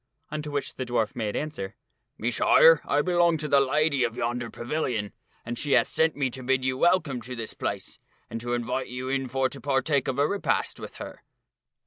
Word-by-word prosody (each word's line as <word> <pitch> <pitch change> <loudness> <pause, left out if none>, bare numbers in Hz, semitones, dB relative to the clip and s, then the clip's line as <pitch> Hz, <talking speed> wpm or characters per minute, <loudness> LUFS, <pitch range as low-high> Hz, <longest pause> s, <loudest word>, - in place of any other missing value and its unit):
Unto 150 0 -4
which 145 -1 -3
the 130 - -2
dwarf 120 -3 -1
made 110 -4 -2
answer, 125 -11 -4 0.2
" - - -52
Messire, 120 +7 +5
I 145 +1 +2
belong 175 -1 +3
unto 155 -1 -3
the 140 -1 +5
lady 140 0 +2
of 115 - -1
yonder 120 0 -2
pavilion, 120 -5 -3 0.3
and 120 +1 -4
she 145 -1 0
hath 120 - +4
sent 160 -1 +2
me 135 -3 0
to 130 - -5
bid 130 0 +1
you 130 0 +1
welcome 155 -5 +2
to 125 +2 -7
this 115 -2 -5
place, - - -4 0.3
and 115 - -6
to 120 0 -1
invite 120 +2 -2
you 125 +1 -5
in 135 -1 -1
for 135 +1 +1
to 140 - -7
partake 140 +1 +1
of 130 -1 -1
a 145 +1 +3
repast 200 +3 -1
with - - -8
her." - - -9
130 Hz, 205 wpm, -26 LUFS, 120-150 Hz, 0.3 s, Messire